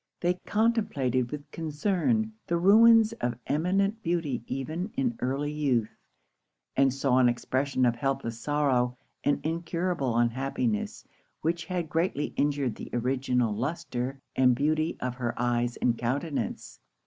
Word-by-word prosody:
They 175 0 +2
contemplated 205 - +1
with 145 +1 -7
concern 195 - 0
the 170 - +1
ruins 225 +4 +6
of 120 0 0
eminent 195 +8 +1
beauty 165 - -1
even 160 - -3
in 250 -3 +1
early 140 +3 -1
youth, 135 -7 0 0.8
and 135 0 +4
saw 135 -1 +2
an 125 -1 +5
expression 130 +2 0
of 120 -1 +2
helpless 120 -3 -2
sorrow 125 -3 +1 0.3
and 145 - +2
incurable 165 -5 -1
unhappiness, 120 -2 -1 0.4
which 165 +1 -1
had 175 -2 -2
greatly 160 -2 -1
injured 140 -4 +1
the - - -9
original 125 -2 +1
lustre 135 0 -3 0.2
and 125 -1 +4
beauty 155 +4 0
of 125 -1 -2
her 120 -2 -3
eyes 120 0 0
and 120 -1 +1
countenance. 130 - -3
140 Hz, 130 wpm, -28 LUFS, 125-170 Hz, 0.8 s, ruins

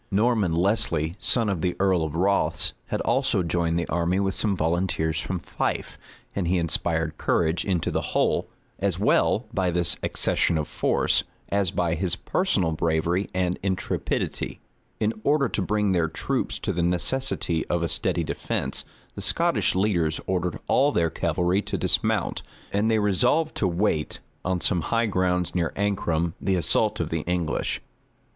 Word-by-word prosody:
Norman 105 -3 +2
Lesly, 85 -4 +1
son 115 -3 +2
of 95 -5 -1
the 90 0 0
earl 95 -3 +3
of 80 -1 -4
Rothes, 100 +4 +2
had - - -2
also 90 - +1
joined 85 0 0
the 85 - -1
army 85 +2 +1
with 95 -1 0
some 100 -2 -1
volunteers 80 -1 0
from 95 - -3
Fife; 85 - -3 0.4
and 95 -4 -1
he 90 +2 +2
inspired 80 -1 -1
courage 80 0 +1
into 90 -5 0
the - - 0
whole, - - 0 0.3
as - - 0
well - - +2
by 95 -1 +1
this 85 0 0
accession 85 - +1
of 75 - -2
force, - - +1 0.3
as 100 -2 +1
by 85 -1 0
his 90 +1 0
personal 100 - 0
bravery 85 +4 0
and 90 -1 0
intrepidity. 95 -1 -2 0.4
In 110 +1 +1
order 140 -1 +3
to - - -2
bring 105 +1 +1
their 85 -3 +2
troops 80 - -2
to - - -2
the 85 - -1
necessity 90 0 0
of 85 -1 0
a - - +1
steady 80 +1 0
defence, - - -2 0.3
the - - -7
Scottish - - +2
leaders 85 -6 +1
ordered 90 -2 -1
all 140 +2 +4
their 85 - +1
cavalry 90 +4 +1
to - - -3
dismount, - - +1 0.3
and 105 +3 +2
they 110 - +3
resolved 125 - +2
to 100 - +1
wait, 85 -3 0 0.3
on 90 -1 -1
some 85 +1 +2
high 115 +7 +1
grounds 90 -3 0
near 85 -3 0
Ancram, 85 -5 0
the 95 - +1
assault 90 +5 +1
of 80 -2 -2
the 80 -1 -1
English. 90 -3 -1
90 Hz, 165 wpm, -25 LUFS, 85-100 Hz, 0.4 s, all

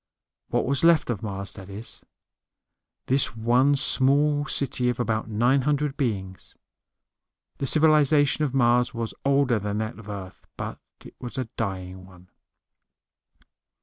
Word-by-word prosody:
What - - 0
was 140 +2 -1
left 165 -6 +4
of 105 - -4
Mars, 100 -2 -5
that 95 -2 -11
is; 105 +4 -8 1.0
this 130 -2 +1
one 125 +5 +3
small 145 +2 +2
city 125 -4 0
of 125 - -3
about 110 -2 -1
nine 120 +6 +2
hundred 150 +1 -1
beings. 100 -9 -4 1.0
The 135 - -1
civilization 150 -1 +4
of 145 - 0
Mars 125 -2 +2
was 115 -1 -4
older 135 -4 +2
than 105 +1 -3
that 110 +1 -4
of 110 -2 -12
Earth, 95 -2 -9
but - - -6 0.3
it - - -12
was 125 +2 -7
a 130 -3 -3
dying 95 -3 -5
one. 90 -1 -18
120 Hz, 140 wpm, -25 LUFS, 105-140 Hz, 1.0 s, left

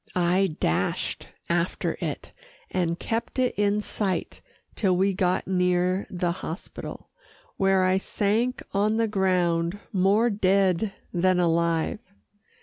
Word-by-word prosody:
I 180 -1 +2
dashed 85 +4 -1 0.2
after 170 +1 0
it, - - -4 0.4
and 170 -2 0
kept 230 +3 -3
it 255 -1 +2
in 205 0 +1
sight 200 -3 -3 0.3
till 185 -4 +2
we 195 +1 +2
got 185 -1 +1
near 180 0 +1
the 175 -1 -1
hospital, 170 +1 -7 0.5
where 195 -1 +3
I 185 +1 +3
sank 220 +6 0
on 210 +2 +1
the 225 0 +2
ground, 180 -3 +1
more 205 +5 +3
dead 195 0 +2 0.2
than 185 0 +2
alive. 170 +1 +1
185 Hz, 120 wpm, -26 LUFS, 175-200 Hz, 0.5 s, where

